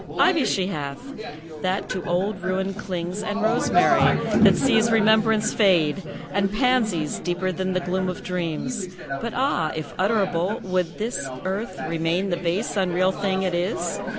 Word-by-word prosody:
Ivy 335 Hz, -7 st, +4 dB
she 185 Hz, -2 st, 0 dB
hath, 145 Hz, -7 st, -4 dB, 0.6 s
that 185 Hz, +1 st, -1 dB
to 185 Hz, -, -3 dB
old 190 Hz, +3 st, -1 dB
ruin 190 Hz, +1 st, -1 dB
clings; 185 Hz, -1 st, -4 dB
And 210 Hz, +1 st, -3 dB
rosemary, 230 Hz, +3 st, +3 dB, 0.4 s
that -, -, +7 dB
sees 230 Hz, -3 st, +3 dB
remembrance 220 Hz, 0 st, +3 dB
fade; 180 Hz, -5 st, +3 dB, 0.3 s
And 195 Hz, 0 st, +1 dB
pansies, 215 Hz, -, +1 dB
deeper 180 Hz, +1 st, -2 dB
than 185 Hz, +2 st, -2 dB
the 185 Hz, -, 0 dB
gloom 185 Hz, +1 st, -1 dB
of 180 Hz, -, -6 dB
dreams; 180 Hz, +5 st, -3 dB, 0.3 s
But 235 Hz, -, -4 dB
ah! 250 Hz, -, +1 dB
if 155 Hz, -2 st, -6 dB
utterable, 190 Hz, -2 st, +1 dB
would 180 Hz, -3 st, -1 dB
this 210 Hz, -, -3 dB, 0.2 s
earth 200 Hz, +5 st, -3 dB
Remain 165 Hz, +4 st, 0 dB
the 175 Hz, -, 0 dB
base, 175 Hz, +5 st, -2 dB
unreal 185 Hz, 0 st, +2 dB
thing 190 Hz, -1 st, -1 dB
it 185 Hz, -2 st, -1 dB
is? 175 Hz, +5 st, -1 dB
190 Hz, 150 wpm, -24 LUFS, 175-215 Hz, 0.6 s, that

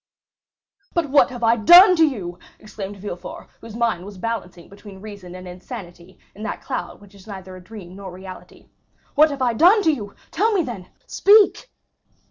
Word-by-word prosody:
"But 330 Hz, -5 st, -1 dB
what 285 Hz, -, +5 dB
have 245 Hz, -2 st, -8 dB
I 230 Hz, +1 st, +4 dB
done 355 Hz, -, +8 dB
to 325 Hz, -, +5 dB
you?" 180 Hz, -11 st, -6 dB, 0.2 s
exclaimed 205 Hz, -1 st, -9 dB
Villefort, 190 Hz, -2 st, -8 dB
whose 225 Hz, -1 st, -11 dB
mind 230 Hz, -7 st, -1 dB
was 200 Hz, 0 st, -11 dB
balancing 185 Hz, -5 st, -5 dB
between 200 Hz, -1 st, -13 dB
reason 200 Hz, -3 st, -10 dB
and 185 Hz, 0 st, -10 dB
insanity, 180 Hz, 0 st, -11 dB, 0.2 s
in 210 Hz, -, -13 dB
that 220 Hz, -, -5 dB
cloud 260 Hz, -, -5 dB
which 205 Hz, -1 st, -18 dB
is 200 Hz, +1 st, -17 dB
neither 190 Hz, -2 st, -9 dB
a 185 Hz, -, -12 dB
dream 185 Hz, -2 st, -11 dB
nor 195 Hz, -1 st, -9 dB
reality; 185 Hz, 0 st, -12 dB, 0.4 s
"what 310 Hz, +2 st, +5 dB
have 280 Hz, -3 st, -4 dB
I 240 Hz, -2 st, +1 dB
done 365 Hz, -, +5 dB
to 320 Hz, -, +3 dB
you? 205 Hz, -7 st, -7 dB, 0.2 s
Tell 430 Hz, +6 st, +1 dB
me, 375 Hz, -4 st, +1 dB
then! 225 Hz, -10 st, -8 dB, 0.2 s
Speak!" 425 Hz, +4 st, +4 dB
210 Hz, 180 wpm, -21 LUFS, 185-275 Hz, 0.4 s, done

